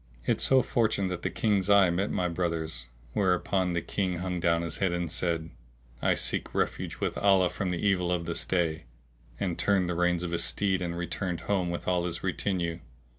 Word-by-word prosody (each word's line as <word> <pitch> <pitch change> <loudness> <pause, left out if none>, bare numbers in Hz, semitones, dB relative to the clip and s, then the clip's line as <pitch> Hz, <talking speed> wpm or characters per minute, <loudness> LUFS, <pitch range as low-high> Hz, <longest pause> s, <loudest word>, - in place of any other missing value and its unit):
It - - +1
so 130 -1 +4
fortuned 110 -5 +1
that 90 -1 -4
the - - -1
King's 100 -3 +1
eye 100 -3 +6
met 95 +4 0
my 90 - 0
brother's; 80 -7 -2 0.3
whereupon 90 0 +1
the 85 - -1
King 95 -3 -1
hung 90 0 -2
down 85 0 +2
his 85 -2 -4
head 95 -2 +1
and 85 -2 -2
said, 85 -2 -1 0.5
"I - - +3
seek - - -2
refuge - - -1
with - - -1
Allah 95 -3 +4
from 95 - -2
the 90 +2 -2
evil 90 -3 +2
of 85 -1 -1
this 85 0 -1
day!";[FN#658] 85 -4 0 0.6
and 90 -3 -3
turned 95 -3 +2
the 90 - -1
reins 90 0 +1
of 85 - -3
his 85 - 0
steed 95 -2 +1
and 85 -1 -3
returned 90 0 -3
home 95 -4 0
with 85 - -4
all 90 -1 +1
his 85 -1 -3
retinue. 90 -3 -1
90 Hz, 200 wpm, -28 LUFS, 85-95 Hz, 0.6 s, eye